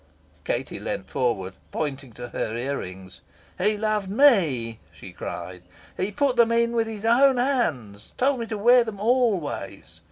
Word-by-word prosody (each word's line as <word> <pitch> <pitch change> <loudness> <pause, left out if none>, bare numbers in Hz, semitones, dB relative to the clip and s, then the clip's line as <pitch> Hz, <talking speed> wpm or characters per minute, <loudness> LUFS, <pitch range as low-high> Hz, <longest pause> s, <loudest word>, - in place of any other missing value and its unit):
Katie - - -3
leaned - - -5
forward, 95 -7 -1 0.2
pointing 140 -4 -4
to 120 +2 -8
her 110 - -3
ear 135 +4 -2
rings. 95 0 -9 0.4
"He 210 +3 +2
loved 210 -2 -1
ME," 165 - +3
she - - -12
cried. 90 -1 -7 0.3
"He 190 +3 -2
put 265 +3 0
them 230 -1 +5
in 235 0 +2
with 230 -1 0
his 220 -1 -6
own 260 +3 +5
hands 160 - -1
told 270 0 +2
me 230 - -4
to 220 - -4
wear 240 +4 +6
them 220 -4 -7
always. 220 - -1
210 Hz, 160 wpm, -24 LUFS, -, 0.4 s, wear